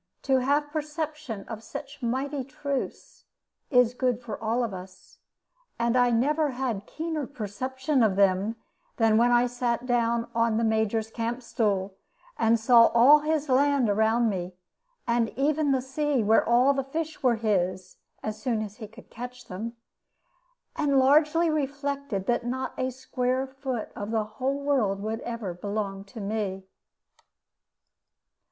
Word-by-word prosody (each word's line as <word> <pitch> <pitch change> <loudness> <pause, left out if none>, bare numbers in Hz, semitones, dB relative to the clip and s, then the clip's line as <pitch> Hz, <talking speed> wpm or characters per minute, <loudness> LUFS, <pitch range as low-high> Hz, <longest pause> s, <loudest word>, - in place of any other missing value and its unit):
To 265 -1 +3
have 290 +3 +1
perception 305 -7 -4
of 220 -2 -6
such 280 +5 -8
mighty 265 +3 -2
truths 275 +1 -5 0.4
is 250 -3 +4
good 250 -2 0
for 240 -3 -6
all 230 +3 +1
of 225 -4 -3
us: 185 0 -11 0.6
and 235 +1 +1
I 245 -1 +4
never 295 +6 +2
had 250 -6 -3
keener 315 -4 -3
perception 260 +3 -2
of 215 -4 +3
them 195 +2 +2 0.4
than 225 -1 +4
when 240 +1 +4
I 240 0 +5
sat 245 -1 -2
down 235 -1 +1
on 230 -1 +2
the 230 - +1
Major's 220 0 0
camp 235 +2 -3
stool, 205 -5 -1 0.4
and 225 - +3
saw 230 0 +7
all 270 +6 +8
his 305 0 -1
land 270 -3 +3
around 220 +3 +2
me, 180 -3 -3 0.5
and 235 -1 +1
even 290 +1 +2
the 260 -2 +1
sea 275 -1 0
where 220 +2 +4
all 245 +4 +4
the 270 -1 -1
fish 315 +3 -4
were 250 -3 +3
his, 185 -4 -1 0.3
as 215 0 -4
soon 230 -5 0
as 210 0 -9
he 220 - -8
could 215 - -16
catch 250 +1 -8
them 225 +4 -6 1.0
and 280 -2 +2
largely 300 +5 +4
reflected 280 -7 -2
that 240 +2 +1
not 255 +2 -3
a 255 0 -1
square 255 0 -2
foot 265 -3 -5
of 205 0 -5
the 220 -1 +1
whole 260 +6 -3
world 235 -9 +1
would 220 +1 -2
ever 230 -7 -5
belong 200 +1 -4
to 220 +3 -11
me. 200 -2 -3
240 Hz, 150 wpm, -27 LUFS, 220-275 Hz, 1.0 s, all